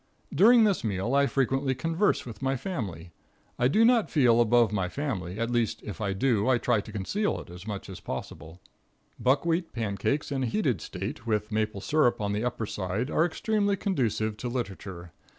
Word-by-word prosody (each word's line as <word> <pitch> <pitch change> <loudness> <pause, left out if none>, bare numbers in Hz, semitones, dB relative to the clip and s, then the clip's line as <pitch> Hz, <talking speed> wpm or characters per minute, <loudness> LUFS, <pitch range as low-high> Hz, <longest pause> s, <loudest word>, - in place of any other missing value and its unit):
During 225 +9 +6
this 205 -3 +2
meal 105 +3 -1
I 140 0 +4
frequently 135 0 0
converse 165 +9 0
with 115 -4 -9
my 135 0 0
family. 100 - -5 0.5
I 125 - +4
do 215 - +4
not 235 -2 +4
feel 120 -6 +4
above 120 -2 +4
my 95 -3 0
family, 95 - -4
at 115 +1 -1
least, 120 -2 0
if 105 - -7
I 100 -2 0
do, 110 +1 +1
I 130 - +4
try 120 -3 +1
to 110 - -11
conceal 155 - -1
it - - -11
as 90 +4 -10
much 100 -2 -5
as 95 -2 -8
possible. 80 +6 -7 0.6
Buckwheat 165 +6 +1
pancakes 115 +7 -1
in 135 -1 -1
a 130 - 0
heated 125 - 0
state, 115 - -6
with 105 -1 -1
maple 110 -2 -1
syrup 125 +4 +2
on 105 -1 -1
the 105 +2 -1
upper 120 -2 -2
side, 105 +6 -3
are 165 - +3
extremely 205 +3 0
conducive 115 - -1
to 125 - -4
literature. 95 -7 -5
120 Hz, 185 wpm, -28 LUFS, 100-145 Hz, 0.6 s, During